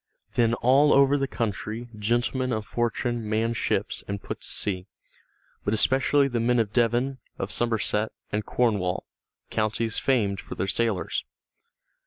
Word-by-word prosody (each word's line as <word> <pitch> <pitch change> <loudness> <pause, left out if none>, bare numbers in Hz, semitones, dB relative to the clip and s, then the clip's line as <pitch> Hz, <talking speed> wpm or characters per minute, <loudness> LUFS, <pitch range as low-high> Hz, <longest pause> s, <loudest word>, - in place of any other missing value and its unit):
Then 115 -1 +3
all 135 +5 +4
over 140 +1 +5
the 135 -1 0
country 115 0 -3
gentlemen 120 +4 0
of 110 -2 -2
fortune 120 -1 -1
manned 115 +2 +1
ships - - 0
and 100 0 -3
put - - -7
to - - -9
sea, 95 -2 -1 0.8
but 105 - +1
especially 135 +4 +3
the 120 -3 -1
men 120 +2 +2
of 110 -3 0
Devon, 120 +3 +1 0.2
of 95 - -3
Somerset, 110 -2 0 0.2
and 105 +1 -1
Cornwall, 105 -7 0 0.5
counties 110 +1 0
famed 105 -7 +1
for - - -8
their - - -1
sailors. 105 -1 0
115 Hz, 145 wpm, -26 LUFS, 105-125 Hz, 0.8 s, over